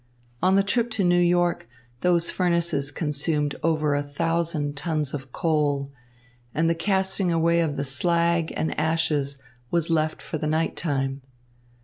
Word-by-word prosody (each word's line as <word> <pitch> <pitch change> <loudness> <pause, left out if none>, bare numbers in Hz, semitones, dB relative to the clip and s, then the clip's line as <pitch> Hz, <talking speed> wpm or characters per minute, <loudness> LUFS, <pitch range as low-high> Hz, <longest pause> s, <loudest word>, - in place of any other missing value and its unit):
On 185 +2 +4
the 195 - +4
trip 235 +4 0
to 205 - 0
New 175 0 +4
York 175 -6 +1 0.3
those 175 +1 +2
furnaces 170 -5 0
consumed 150 0 -1
over 155 -2 +1
a 145 - +1
thousand 150 0 -1
tons 150 -1 -2
of 135 -3 -6
coal, 145 -3 0 0.6
and 165 +2 +2
the 165 - +3
casting 190 +1 0
away 170 0 +3
of 155 -4 0
the 140 - -1
slag 170 +4 +1
and 160 - -1
ashes 150 -3 0 0.3
was 170 -1 0
left 155 -1 +1
for 155 - -5
the 155 - -2
nighttime. 145 -4 -1
160 Hz, 145 wpm, -25 LUFS, 145-170 Hz, 0.6 s, On